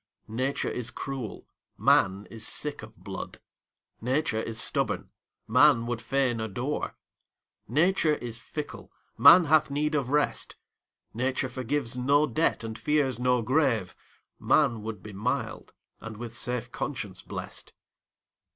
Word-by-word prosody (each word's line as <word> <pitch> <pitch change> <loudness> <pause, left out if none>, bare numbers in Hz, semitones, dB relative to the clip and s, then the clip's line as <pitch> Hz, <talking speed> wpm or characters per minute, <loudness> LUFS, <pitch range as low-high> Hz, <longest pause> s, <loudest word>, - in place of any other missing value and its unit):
Nature 130 +5 -1
is 120 -2 -3
cruel, 130 -4 -6 0.3
man 95 +2 +3
is 110 -1 -5
sick 150 -1 +1
of 110 -1 -12
blood; 95 -2 -7 0.6
Nature 130 -1 0
is 115 0 -4
stubborn, - - -1 0.4
man 125 0 +5
would 120 -1 -3
fain 125 0 0
adore; 120 +7 -3 0.7
Nature 155 - +3
is 120 -3 -5
fickle, 150 +4 -7 0.2
man 175 +1 +9
hath 155 -1 +3
need 150 +2 -1
of 140 -4 0
rest; 150 +1 0 0.6
Nature 130 +2 -1
forgives 130 0 -2
no 140 +4 +3
debt, 155 -5 0
and 110 0 -6
fears 135 -2 +1
no 125 -1 +2
grave; 125 - +1 0.4
Man 125 -8 +3
would 105 -3 -6
be 105 - -9
mild, 110 +3 -3 0.3
and 110 -2 -8
with 120 0 -7
safe 120 0 -3
conscience 105 -13 -4
blest. - - -7
125 Hz, 130 wpm, -28 LUFS, 115-145 Hz, 0.7 s, man